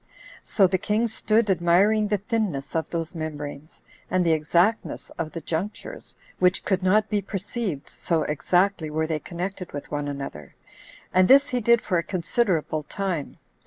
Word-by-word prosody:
So 200 - +3
the 185 0 +1
king 215 +5 +1
stood 220 0 +1
admiring 190 +4 +3
the 205 0 +1
thinness 200 - -2
of 160 - -1
those 165 -2 -3
membranes, 150 -2 -7 0.3
and 185 -1 +2
the 165 - +3
exactness 170 +7 +1
of 155 -1 -5
the 165 - -5
junctures, 200 - -5 0.2
which 180 +1 +2
could 190 -1 +1
not 210 +4 +3
be 210 -2 0
perceived; 195 - -4
[so 165 -3 -1
exactly 175 +3 +1
were 160 +1 0
they 155 -1 -2
connected 180 +3 -5 0.2
one 145 0 -2
with 145 0 -3
another;] 75 - -8 0.6
and 185 0 +5
this 280 +2 +6
he 250 -1 -1
did 235 +1 +4
for 180 -4 +1
a - - -2
considerable 175 -4 0
time. 175 -1 -4
180 Hz, 160 wpm, -25 LUFS, 160-210 Hz, 0.6 s, this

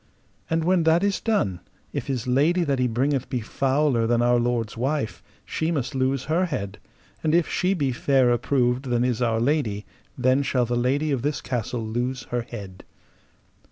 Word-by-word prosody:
And 165 0 +1
when 180 +1 +3
that 165 +3 +4
is 200 -1 +1
done, 105 - 0 0.3
if - - -3
his 130 -4 -2
lady 150 +8 +2
that 140 -4 0
he 125 - +2
bringeth 130 +3 0
be 125 - -1
fouler 130 +1 +1
than 120 0 +2
our 120 0 +4
lord's 120 -2 -1
wife, 130 0 -2 0.2
she 160 - -2
must 140 -4 -2
lose 130 0 0
her 165 +5 +1
head: 100 - -4 0.4
and 160 0 +2
if 170 -1 +3
she 185 +2 0
be 140 -6 0
fairer 125 -1 +2
proved 125 -1 +1
than 120 -1 +1
is 125 -2 0
our 115 -2 +1
lady, 115 -6 0 0.3
then 130 +1 +3
shall 130 -3 +1
the 120 +1 -1
lady 135 +5 +1
of 135 -4 0
this 145 +2 -1
castle 120 -3 -3
lose 120 +4 -2
her 120 0 0
head. 100 -6 -9
130 Hz, 185 wpm, -24 LUFS, 120-150 Hz, 0.4 s, that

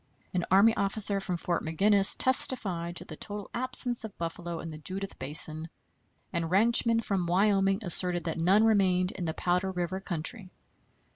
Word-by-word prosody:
An 180 -2 -2
army 200 +4 +4
officer 200 0 +3
from 185 -2 -4
Fort 170 0 -3
Maginnis 195 +5 +2
testified 190 -10 +2
to - - -6
the 155 - -9
total 205 +4 -8
absence 250 -1 +3
of 220 -3 -10
buffalo 170 0 -6
in 165 - -8
the 155 - -10
Judith 190 +5 -6
Basin, 155 +3 0 0.6
and 170 -2 -2
ranchmen 230 +4 +3
from 195 -5 -3
Wyoming 195 +2 +1
asserted 175 -1 -1
that 165 -1 -4
none 190 +6 +3
remained 190 -4 +1
in 180 - -6
the 160 - -4
Powder 180 +2 -1
River 180 +1 -4
country. 185 +3 -2
185 Hz, 160 wpm, -28 LUFS, 170-205 Hz, 0.6 s, army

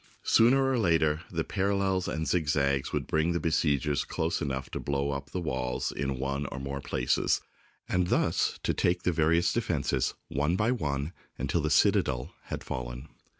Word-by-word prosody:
Sooner 130 +4 +5
or 130 -2 +1
later, 80 -5 +2
the 80 -2 -1
parallels 95 -1 0
and 80 0 -2
zigzags 70 -5 +1
would - - -1
bring 80 +2 +1
the 85 - 0
besiegers 75 -3 +1
close - - -2
enough 65 -1 -2
to - - -3
blow 70 0 -1
up 70 0 -5
the 90 - -3
walls 65 -5 -2
in 70 -1 -2
one 70 +2 -2
or 70 - -6
more 70 0 -4
places, 65 -3 +1 0.5
and 90 -1 +1
thus - - +1
to - - +1
take 90 0 +1
the 90 - +2
various 85 +1 +2
defences - - 0
one 75 +5 0
by 105 +5 +2
one 75 - -2 0.2
until - - 0
the - - 0
citadel 60 -2 +2
had - - -5
fallen. 60 +3 -5
75 Hz, 170 wpm, -29 LUFS, 70-90 Hz, 0.5 s, Sooner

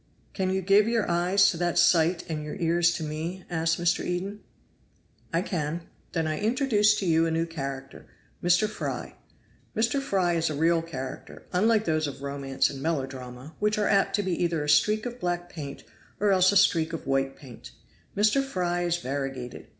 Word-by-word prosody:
"Can 190 -2 -1
you 190 0 -1
give 200 +3 +5
your 230 -2 +1
eyes 180 +3 +3
to 170 - -6
that 175 0 -1
sight 175 0 +4
and 155 -2 -4
your 150 - -6
ears 170 0 +2
to 165 - -4
me?" 160 +5 -5
asked 165 0 0
Mr. 175 0 +1
Eden. 190 +4 -3 0.9
"I 170 +2 +1
can." 165 -3 -3 0.3
"Then 165 -2 0
I 155 -1 -2
introduce 215 -2 +3
to 195 - -2
you 165 -1 +3
a - - 0
new 165 +1 0
character 135 -4 -7 0.4
Mr. 175 +4 +4
Fry. 215 - -5 0.6
Mr. 235 +5 +1
Fry 190 -9 +1
is 165 -1 +1
a 155 - -3
real 165 +2 +2
character, 135 -6 -7
unlike 215 +4 +3
those 155 -1 +1
of 140 -1 -8
romance 140 -1 0
and 135 -1 -7
melodrama, 135 -2 -4
which 210 0 +1
are 210 - +1
apt 195 -1 +2
to 205 - 0
be 190 - -2
either 165 -3 0
a 150 - -3
streak 210 +9 +3
of 245 0 -5
black 175 0 -2
paint 140 -4 -7 0.4
or 205 -1 +3
else 185 0 +5
a 200 - +4
streak 165 -4 +3
of 165 - -5
white 135 0 0
paint. 130 -5 -12 0.5
Mr. 215 +7 +3
Fry 180 -9 -1
is 175 -1 0
variegated. 135 -4 -5
170 Hz, 190 wpm, -27 LUFS, 150-195 Hz, 0.9 s, give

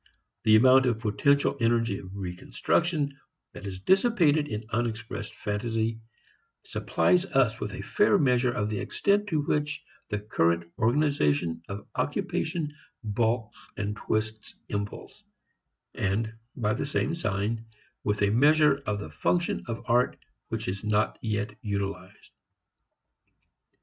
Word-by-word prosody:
The 110 - +7
amount 130 +3 +6
of 120 -3 +1
potential 140 +7 +2
energy 115 -3 +2
of 95 0 -10
reconstruction 140 - -1 0.3
that 100 - -8
is 95 -1 -6
dissipated 175 - +3
in 105 -5 -4
unexpressed 115 -1 -3
fantasy 110 +2 -2 0.6
supplies 175 - +2
us 125 - +2
with 105 -1 -4
a - - -6
fair 210 0 +3
measure 125 -5 +3
of 105 -3 -1
the 105 - -2
extent 205 +1 +1
to 155 -6 0
which 150 0 -1 0.3
the 105 - -1
current 85 -5 +1 0.2
organization 110 - +2
of 100 +1 -6
occupation 160 -3 -2 0.3
balks 110 +1 -1
and 105 0 -2
twists 110 +1 -3
impulse, 100 0 -5 0.7
and, 110 +3 -1 0.2
by 105 -4 0
the 140 - -2
same 145 +2 0
sign, 110 - -1 0.4
with 105 0 0
a 100 - +3
measure 145 +3 +5
of 105 -1 0
the 105 - -7
function 175 -1 0
of 115 -1 -4
art 125 +1 +2 0.3
which - - -4
is 95 +2 -3
not 105 0 +1
yet 105 -1 -2
utilized. 100 -4 -4
110 Hz, 130 wpm, -28 LUFS, 105-140 Hz, 0.7 s, The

